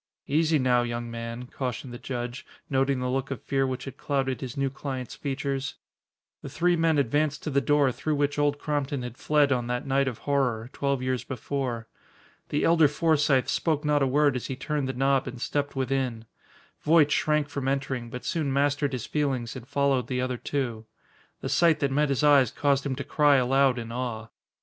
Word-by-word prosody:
"Easy 155 +2 +2
now, 125 -2 +3
young 120 0 -3
man," 115 +1 -5
cautioned 125 0 -5
the 120 - -7
judge, 120 0 -5 0.3
noting 135 0 +2
the 125 - -2
look 135 +1 -1
of 135 -5 -4
fear 135 -1 +1
which 130 -1 -4
had 135 -1 -8
clouded 135 -2 -1
his 130 -1 -6
new 135 -1 0
client's 135 -2 -5
features. 140 -1 -3 0.7
The - - -7
three 175 +5 +2
men 165 -2 +2
advanced 145 +2 +1
to 155 - -3
the 140 0 +2
door 145 -1 +3
through 155 +5 -2
which 145 0 0
Old 145 0 +2
Crompton 145 -3 -2
had 125 -1 -6
fled 145 +1 +2
on 120 -2 0
that 125 0 -2
night 135 0 +2
of 125 -4 -3
horror, 125 -4 0
twelve 140 -2 -1
years 130 -1 -1
before. 125 -3 -3 0.6
The 145 - 0
elder 165 -2 +5
Forsythe 145 -3 +2
spoke 155 -3 0
not 150 -1 +2
a 135 - +3
word 145 +1 +3
as 125 - -3
he 135 - -3
turned 145 0 -2
the - - -2
knob 135 +1 +1
and 125 -1 -6
stepped 145 +3 -2
within. 130 -4 -1 0.6
Voight 150 -1 +4
shrank 150 -1 +2
from 140 -2 -4
entering, 135 -3 -2
but 125 +1 -7
soon 155 -5 -1
mastered 145 0 +1
his 125 -3 -3
feelings 135 -6 -1
and 125 -2 -9
followed 140 -2 +1
the 125 -1 -2
other 125 0 -1
two. 120 -5 -3 0.5
The - - -3
sight 165 -3 +4
that 140 -1 +1
met 150 +2 +2
his 140 +1 0
eyes 140 -5 +6
caused 140 +2 +1
him 130 - -2
to 140 - -4
cry 145 +2 +3
aloud 135 0 +3
in 115 -1 -5
awe. 115 -3 -4
135 Hz, 200 wpm, -27 LUFS, 125-145 Hz, 0.7 s, eyes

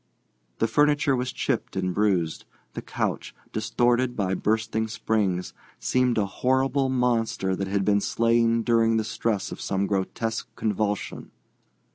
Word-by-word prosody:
The 115 - +1
furniture 145 +2 +3
was 125 0 -2
chipped - - -2
and 95 -1 -1
bruised; 95 -6 0 0.3
the - - -5
couch, - - -3 0.2
distorted 120 +3 +1
by 95 -3 0
bursting 110 +2 0
springs, 105 -4 -1 0.2
seemed 125 -2 +1
a 105 - +2
horrible 130 +5 +1
monster 115 -6 +1
that 95 +1 -3
had 100 0 0
been 100 -1 +3
slain 115 +1 +2
during 115 -1 +3
the 110 - +1
stress 110 -2 -2
of - - -7
some 100 0 0
grotesque 105 +3 -2
convulsion. 105 -1 -2
110 Hz, 135 wpm, -25 LUFS, 100-120 Hz, 0.3 s, furniture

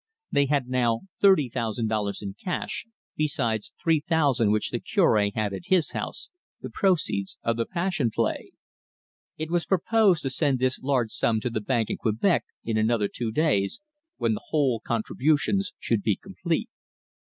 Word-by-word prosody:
They 140 0 +3
had 140 -3 +1
now 120 -3 +1 0.2
thirty 190 -9 +5
thousand 115 -1 -2
dollars 105 -2 -2
in 100 -1 -5
cash, 180 - -4 0.3
besides 120 -8 -1
three 165 -2 +3
thousand 145 - +2
which 105 0 +1
the 120 - -1
Cure 115 - +3
had 105 -2 -1
at 95 - -6
his 180 -4 +2
house, - - -6 0.3
the - - -7
proceeds 155 - 0
of 115 - +1
the 115 0 -2
Passion 175 -8 0
Play. - - -1 0.9
It 155 +1 -4
was 175 -1 0
proposed 195 -1 +3
to 135 - -1
send 135 0 +1
this 130 0 0
large 130 -5 0
sum 110 -1 +1
to 125 - -2
the 110 - -2
bank 115 0 0
in - - -2
Quebec 115 - +1 0.2
in 110 -1 -1
another 110 -1 +2
two 115 +2 -4
days, 145 - +1 0.4
when - - +1
the 215 - -6
whole 135 -7 +1
contributions 145 - 0
should 115 -3 0
be 105 -1 +1
complete. 175 - -3
130 Hz, 165 wpm, -26 LUFS, 110-160 Hz, 0.9 s, thirty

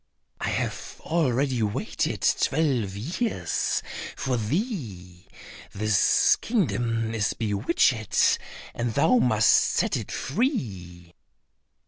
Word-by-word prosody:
I - - -2
have - - -4
already 135 -6 0
waited 105 -1 -2
twelve 130 -10 +1
years 130 - -2 0.3
for 130 -2 -1
thee; 110 - -4 0.5
this 105 -1 +3
kingdom 120 - -1
is 105 -2 0
bewitched, 110 - +1 0.3
and 120 -1 -3
thou 160 - +4
must 110 - +4
set - - +2
it - - -5
free." 95 - -3
115 Hz, 90 wpm, -25 LUFS, 105-150 Hz, 0.5 s, thou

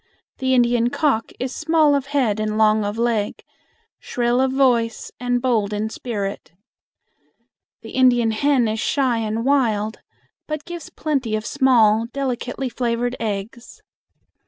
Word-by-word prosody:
The 260 0 +1
Indian 240 -1 +3
cock 255 -5 0
is 255 0 -3
small 315 -2 +3
of 275 -1 0
head 255 -7 0
and 215 0 -1
long 215 0 +3
of 205 +2 -3
leg, 230 -3 -1 0.6
shrill 240 +1 0
of 265 0 +1
voice 245 -4 +1
and 245 0 0
bold 225 -5 0
in 215 +1 -2
spirit. 200 -9 -5 1.3
The - - -9
Indian 245 -3 +3
hen 255 +1 +2
is 220 +1 -2
shy 255 -1 +1
and 225 +1 -2
wild, 225 -6 +1 0.5
but 305 -1 -4
gives 345 -2 -8
plenty 270 -8 -2
of 215 0 -4
small, 230 -5 +3
delicately 260 -1 -3
flavored 245 0 -2
eggs. 220 +2 -5
240 Hz, 135 wpm, -21 LUFS, 220-265 Hz, 1.3 s, Indian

